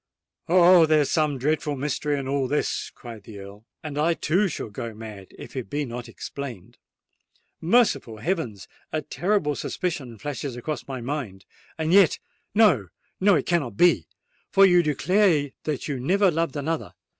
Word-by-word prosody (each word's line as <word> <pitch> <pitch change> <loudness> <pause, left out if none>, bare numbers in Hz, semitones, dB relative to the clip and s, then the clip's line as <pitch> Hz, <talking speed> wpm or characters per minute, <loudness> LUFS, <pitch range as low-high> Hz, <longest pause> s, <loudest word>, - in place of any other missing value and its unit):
"Oh! 175 -1 +7
there 155 -1 +4
is 145 - -1
some 150 -3 +1
dreadful 150 +2 0
mystery 145 +1 -1
in 135 -1 -4
all 135 -1 0
this!" 145 +3 -1
cried 115 -4 -11
the 105 +1 -11
Earl; 100 +2 -11 0.2
"and 150 -2 -4
I 165 +2 +2
too 180 +7 +1
shall 150 - -5
go 115 +1 -6
mad 105 -3 -9
if - - -11
it 130 -3 -5
be 145 +1 -2
not 120 -1 -7
explained! 120 -3 -8 0.8
Merciful 165 - +2
heavens! 120 - -3 0.2
a 155 -1 -2
terrible 180 -5 0
suspicion 135 -12 -4
flashes 140 +1 -5
across 125 -1 -5
my 130 -2 -5
mind. 115 -8 -5 0.3
And 160 +1 0
yet—no—no, 190 - +2
it - - 0
cannot 145 - -1
be,—for 175 - +2
you 180 -2 +5
declare 160 -1 +2
that 150 -3 -3
you 140 -4 -3
never 190 +8 +3
loved 165 -2 -1
another! 155 +2 -3
145 Hz, 155 wpm, -25 LUFS, 120-170 Hz, 0.8 s, Oh